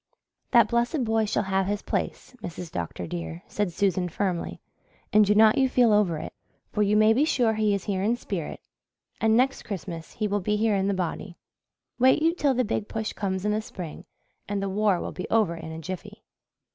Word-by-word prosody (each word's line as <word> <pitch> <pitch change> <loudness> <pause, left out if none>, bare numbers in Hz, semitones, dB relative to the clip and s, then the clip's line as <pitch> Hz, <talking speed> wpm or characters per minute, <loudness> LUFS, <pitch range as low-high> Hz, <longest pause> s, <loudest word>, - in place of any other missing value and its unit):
"That 235 -2 +6
blessed 240 +4 0
boy 225 -1 +1
shall 205 - 0
have 190 -1 0
his 205 +1 -2
place, - - -3
Mrs. 175 -1 -7
Dr. 85 +1 -4
dear," 85 0 -6
said 205 -3 -1
Susan 185 -1 0
firmly, 180 0 -2 0.5
"and 215 0 +7
do 210 +1 +3
not 215 +2 +6
you 265 -1 +3
feel 245 -4 +4
over 200 -6 +3
it, - - -7 0.4
for 210 - -1
you 210 +1 +3
may 215 +1 +6
be 265 +6 +3
sure 245 -7 +2
he 215 -2 +2
is 195 - -4
here 195 -3 -1
in 220 +4 +2
spirit 190 -9 -5 0.6
and 225 0 +3
next 265 +2 +2
Christmas 175 -5 -6
he 215 - -1
will 205 0 -1
be 210 +3 0
here 215 -1 +2
in 195 0 +1
the 200 - +1
body. 180 0 -4 0.6
Wait 260 +5 +5
you 330 +1 +4
till 285 -6 +1
the 255 - +2
Big 215 0 -2
Push 220 -1 -3
comes 190 -1 -2
in 210 - +2
the 215 +1 0
spring 180 -7 -8 0.4
and 205 -1 -1
the 195 0 -2
war 200 -2 +2
will - - -4
be 180 - -6
over 210 -7 +2
in 160 -1 -8
a 160 - -6
jiffy." 185 +5 -7
205 Hz, 210 wpm, -26 LUFS, 185-220 Hz, 0.6 s, and